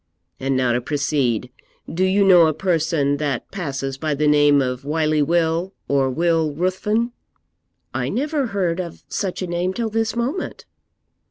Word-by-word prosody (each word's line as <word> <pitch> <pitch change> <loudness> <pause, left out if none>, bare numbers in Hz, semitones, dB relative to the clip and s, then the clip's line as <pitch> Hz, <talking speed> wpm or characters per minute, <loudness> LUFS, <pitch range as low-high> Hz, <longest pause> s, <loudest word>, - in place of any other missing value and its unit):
And 135 0 0
now 130 -2 +2
to 120 - 0
proceed. 130 -3 -1 0.4
Do 180 +3 -1
you 190 +2 +3
know 175 -4 +7
a 155 - 0
person 160 -5 +1
that 140 -4 -3
passes 135 -7 -4
by 155 -1 -1
the 150 +2 0
name 145 -1 +5
of 125 -1 -2
Wily 155 +1 +1
Will, 165 +4 +1
or 135 -1 +2
Will 160 +1 +1
Ruthven?' 210 +7 0 0.8
'I - - -1
never 285 0 -1
heard 185 -4 -1
of 170 -2 -9
such 190 -2 -3
a - - -3
name 175 +2 -1
till 230 -2 -1
this 225 +1 0
moment.' 255 +10 -3
160 Hz, 160 wpm, -21 LUFS, 140-185 Hz, 0.8 s, know